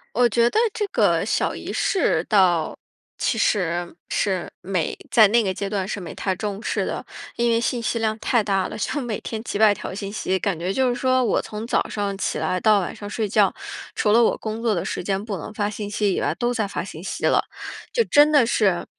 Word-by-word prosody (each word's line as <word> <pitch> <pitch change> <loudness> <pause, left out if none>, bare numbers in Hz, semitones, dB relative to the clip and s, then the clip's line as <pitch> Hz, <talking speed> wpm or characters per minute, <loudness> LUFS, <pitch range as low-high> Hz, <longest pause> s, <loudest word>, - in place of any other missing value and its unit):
我 245 +1 +5
觉 235 +1 +3
得 435 - +1
这 415 - -1
个 - - +2
小 - - 0
仪 - - -6
式 335 - +1
倒 180 -6 +2 0.4
其 230 - 0
实 175 -5 0
是， 190 -3 -1
没 185 -3 -2
在 220 -3 +7
那 235 +2 +4
个 190 - -1
阶 195 +1 -4
段 195 -3 -2
是 205 - -3
没 175 - -7
太 190 -2 -1
重 205 0 -4
视 - - -1
的。 - - -4 0.3
因 235 0 +2
为 230 0 +2
信 235 0 -1
息 230 - -1
量 220 0 0
太 235 -4 +1
大 195 -2 0
了， - - -7
就 290 +7 -2
每 235 -5 -3
天 220 -1 -5
几 205 - -3
百 215 -2 +6
条 190 - -7
信 200 0 -5
息， 190 -3 -1
感 190 -4 -1
觉 185 +3 -2
就 260 -1 +2
是 245 - 0
说 255 0 +2
我 - - +2
从 215 +1 -6
早 - - +1
上 200 -2 -3
起 - - -2
来 185 0 0
到 210 0 +4
晚 175 - -4
上 205 - -8
睡 215 -1 -2
觉， - - +3 0.4
除 210 - +2
了 235 +2 +6
我 - - +3
工 220 +1 -5
作 230 -3 +1
的 170 - -1
时 - - -3
间 195 +2 -1
不 205 -4 -4
能 215 - -8
发 205 -1 -1
信 210 -1 -5
息 205 -1 0
以 - - -1
外， 145 +3 0
都 240 0 0
在 220 -4 -1
发 195 - -4
信 165 -4 -9
息 190 - -4
了。 - - +3 0.5
就 470 - +3
真 295 +1 +5
的 275 -5 +6
是 205 -6 +1
210 Hz, 255 characters per minute, -23 LUFS, 190-230 Hz, 0.5 s, 在